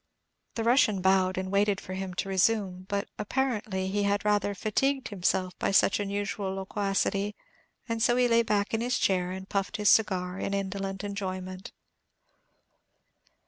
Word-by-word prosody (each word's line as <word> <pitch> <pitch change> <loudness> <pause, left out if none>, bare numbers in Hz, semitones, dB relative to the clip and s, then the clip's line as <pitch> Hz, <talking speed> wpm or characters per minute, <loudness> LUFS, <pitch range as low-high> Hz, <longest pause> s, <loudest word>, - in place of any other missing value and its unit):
The 225 - -1
Russian 230 -4 +4
bowed, 185 0 +2
and 185 0 -3
waited 200 0 +2
for 185 - -8
him 190 -1 -5
to 195 - -2
resume; 190 -1 +1
but, 200 0 -1
apparently, 215 -4 -1
he 205 +1 0
had 200 +1 0
rather 205 -1 +1
fatigued 265 +6 0
himself 185 -2 0
by - - 0
such 195 0 +4
unusual 200 -1 -2
loquacity, 195 +1 -1 0.5
and 230 -1 -2
so 240 +1 +4
he 250 0 +3
lay 230 0 +4
back 210 -2 0
in 225 - +1
his 245 +1 0
chair, 180 -2 +1
and 190 +1 -6
puffed 195 +1 -2
his 210 -2 +3
cigar 185 -4 +2
in 200 - -2
indolent 195 0 -3
enjoyment. 185 -2 -5
200 Hz, 155 wpm, -28 LUFS, 190-210 Hz, 0.5 s, Russian